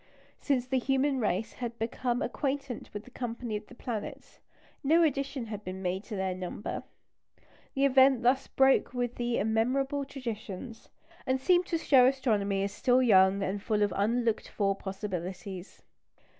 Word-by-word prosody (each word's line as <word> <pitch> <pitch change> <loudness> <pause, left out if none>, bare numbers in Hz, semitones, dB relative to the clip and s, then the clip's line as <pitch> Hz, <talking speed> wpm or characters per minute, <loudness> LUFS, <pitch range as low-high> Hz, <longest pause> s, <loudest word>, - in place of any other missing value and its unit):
Since 260 -4 0
the 260 0 0
human 270 +1 +1
race 210 -1 -1
had 235 -2 -5
become 240 +3 -1
acquainted 275 -3 -3
with 205 0 -6
the 250 - -16
company 240 -2 -4
of 210 0 -6
the 250 - -14
planets, 260 +4 -6 0.4
no 325 +5 +5
addition 275 -4 -1
had 210 -2 -6
been 185 0 -6
made 185 +2 -1
to 220 - -6
their 190 -1 -1
number. 185 +2 -5 0.9
The 275 +1 +3
event 265 -2 +5
thus 260 +3 +3
broke 265 -1 +3
with 245 -1 -2
immemorial 240 +5 0
traditions, 230 -4 -7 0.4
and 260 0 +1
seemed 355 +5 +3
to 335 - 0
show 265 -5 +5
astronomy 210 -7 +1
as 200 - -2
still 255 +4 +3
young 195 -3 +5
and 195 +2 -2
full 210 0 +1
of 205 - 0
unlooked 230 +2 0
for 195 -2 0
possibilities. 190 -1 -6
240 Hz, 155 wpm, -29 LUFS, 205-265 Hz, 0.9 s, no